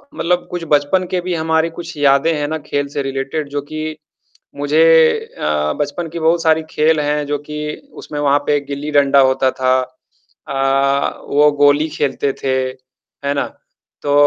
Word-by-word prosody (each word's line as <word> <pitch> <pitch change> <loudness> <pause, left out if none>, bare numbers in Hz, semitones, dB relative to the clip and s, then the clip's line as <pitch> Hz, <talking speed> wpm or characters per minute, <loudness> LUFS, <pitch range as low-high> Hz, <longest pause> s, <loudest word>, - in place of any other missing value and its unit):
मतलब 175 +1 0
कुछ 175 -1 -4
बचपन 150 +6 +2
के 185 - +1
भी 180 0 -3
हमारे 160 0 +1
कुछ 170 0 -8
यादें 145 +3 +3
हैं 145 - -1
ना 160 +1 -2
खेल 145 -1 -1
से 140 - -1
रिलेटेड 135 +2 -3
जो 145 0 -3
कि 155 +1 -6 0.6
मुझे 145 +3 +2 0.6
अ, 75 0 0
बचपन 155 +4 -2
की 170 - -6
बहुत 165 +1 +2
सारी 160 -1 +3
खेल 155 +1 +2
हैं 150 0 0
जो 145 0 -1
कि 150 0 -4 0.4
उसमें 150 - -6
वहाँ 145 0 +3
पे 145 -1 +3
गिल्ली-डंडा 140 0 +2
होता 130 0 +1
था। 130 0 +1 0.7
अ, 135 0 0
वो 150 +1 +4
गोली 145 +2 +4
खेलते 140 -2 -1
थे। 135 -1 +1 0.7
है 140 - +1
ना? 140 - -1 0.6
तो 145 - 0
145 Hz, 165 wpm, -17 LUFS, 140-160 Hz, 0.7 s, वो